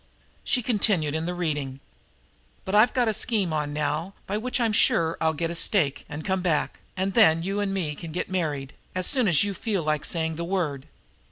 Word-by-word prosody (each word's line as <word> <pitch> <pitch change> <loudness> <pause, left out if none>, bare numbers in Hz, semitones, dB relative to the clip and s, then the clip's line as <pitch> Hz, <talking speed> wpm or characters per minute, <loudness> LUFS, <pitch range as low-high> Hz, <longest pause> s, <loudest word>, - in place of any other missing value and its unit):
She 250 - +1
continued 200 - +1
in 160 +1 -2
the 180 - -2
reading: 145 -6 -2 0.9
"But 190 - -4
I've 215 +3 +6
got 250 -3 +1
a 220 - +2
scheme 205 -6 0
on 150 -1 -1
now 150 +5 -2
by 200 - -3
which 250 +4 -2
I'll 230 -2 +2
sure 165 -5 +3 0.2
get 165 +2 -2
a - - -3
stake 165 -5 +1
and 150 +1 -6
come 190 -1 0
back, 165 -5 0 0.2
and 190 +1 -1
then 165 -7 +5
you 195 +3 -2
and 205 -1 -1
me 175 -6 -2
can 160 +2 -8
get 175 - -3
married, 150 -7 -2 0.2
as 185 0 0
soon 255 -2 +3
as 170 -3 +5
you 205 -1 -1
feel 200 -3 -2
like 155 -1 0
saying 160 -2 -1
the 170 - -3
word. 160 -6 -2
175 Hz, 205 wpm, -26 LUFS, 155-200 Hz, 0.9 s, I've